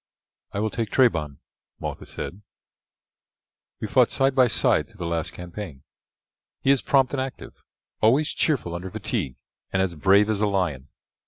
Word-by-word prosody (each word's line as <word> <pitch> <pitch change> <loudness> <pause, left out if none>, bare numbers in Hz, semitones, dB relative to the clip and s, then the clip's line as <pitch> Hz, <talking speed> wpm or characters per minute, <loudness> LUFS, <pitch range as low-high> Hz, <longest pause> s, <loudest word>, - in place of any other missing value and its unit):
"I 100 - -3
will 110 0 0
take 115 -3 -2
Trebon," 80 - +2 0.4
Malchus - - -6
said; 100 - -6 1.4
"we - - -3
fought - - +4
side 135 0 +2
by 130 -2 +5
side 110 - +2
through - - -21
the 85 - -4
last 85 0 -1
campaign. 90 -5 -8 0.8
He 135 - +5
is 140 - +4
prompt 135 -1 +2
and 135 - 0
active, 130 0 -6 0.5
always 135 +8 +4
cheerful 130 - 0
under 90 +2 -5
fatigue, 65 -7 -3 0.4
and 95 - 0
as 95 -2 +1
brave 95 +6 +4
as 110 -2 0
a 105 - +3
lion. 85 -9 -1
100 Hz, 160 wpm, -25 LUFS, 85-125 Hz, 1.4 s, by